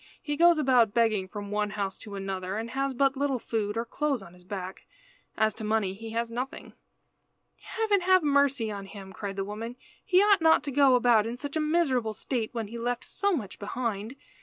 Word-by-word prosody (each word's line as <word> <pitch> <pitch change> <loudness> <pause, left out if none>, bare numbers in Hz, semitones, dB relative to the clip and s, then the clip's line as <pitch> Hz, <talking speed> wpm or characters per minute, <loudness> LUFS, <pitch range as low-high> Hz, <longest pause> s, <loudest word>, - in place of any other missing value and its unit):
"He 295 - -3
goes 340 +2 +6
about 250 -7 +3
begging 220 -5 +2
from 205 +1 -7
one 210 0 0
house 200 -2 -3
to 205 -2 -9
another, 195 0 -4
and 230 +1 -4
has 270 0 -1
but 275 +1 +2
little 275 -1 0
food, 220 -2 -2
or 230 - -1
clothes 275 -2 -1
on 170 - -13
his 180 0 -18
back. 185 0 -7 0.5
As 220 -1 +2
to 220 - -8
money 215 -3 0
he 225 +3 -8
has 230 +1 -2
nothing." 250 +3 -5 0.9
"Heaven 430 -3 0
have 370 -1 +4
mercy 280 -6 +2
on 200 -1 -6
him!" 195 -1 -10
cried 200 0 -5
the 195 0 -2
woman. 225 +4 -6 0.3
"He 365 - +4
ought 410 -3 +4
not 320 0 +5
to 285 - -4
go 270 -1 +5
about 235 -3 +4
in 235 +2 -4
such 285 +2 -6
a - - +1
miserable 290 -8 +1
state 225 +1 -3
when 225 -4 -4
he 235 +1 -7
left 245 +1 -2
so 400 0 0
much 215 - -4
behind. 220 +1 -3
230 Hz, 210 wpm, -28 LUFS, 205-275 Hz, 0.9 s, goes